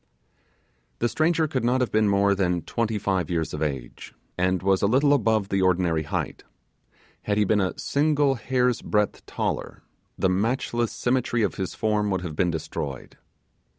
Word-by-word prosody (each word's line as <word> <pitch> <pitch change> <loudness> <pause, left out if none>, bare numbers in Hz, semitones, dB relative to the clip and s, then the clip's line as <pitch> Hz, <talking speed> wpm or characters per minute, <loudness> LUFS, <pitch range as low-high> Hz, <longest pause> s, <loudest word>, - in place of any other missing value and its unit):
The 120 - +1
stranger 160 +4 +1
could 130 -5 -2
not 125 +2 +2
have 125 -6 0
been 110 -1 +3
more 100 0 +3
than 90 -4 0
twenty 115 -2 -1
five 95 -4 -1
years 80 -2 -1
of 75 - -4
age, 70 -6 -5 0.2
and 95 0 0
was 95 -1 +2
a 100 - +3
little 140 +6 +4
above 110 -6 +1
the 95 0 +1
ordinary 90 -3 +2
height; 75 - -4 0.8
had 105 0 -1
he 105 - +3
a 100 -3 +2
single 145 -1 +2
hair's 125 -1 0
breadth 105 -1 0
taller, - - -3 0.3
the - - +2
matchless 115 +4 0
symmetry 120 -2 0
of 100 - 0
his 95 -2 -4
form 105 -1 0
would 95 -2 -1
have 85 -4 -6
been 90 +2 +1
destroyed. 75 -5 -5
105 Hz, 165 wpm, -25 LUFS, 90-120 Hz, 0.8 s, little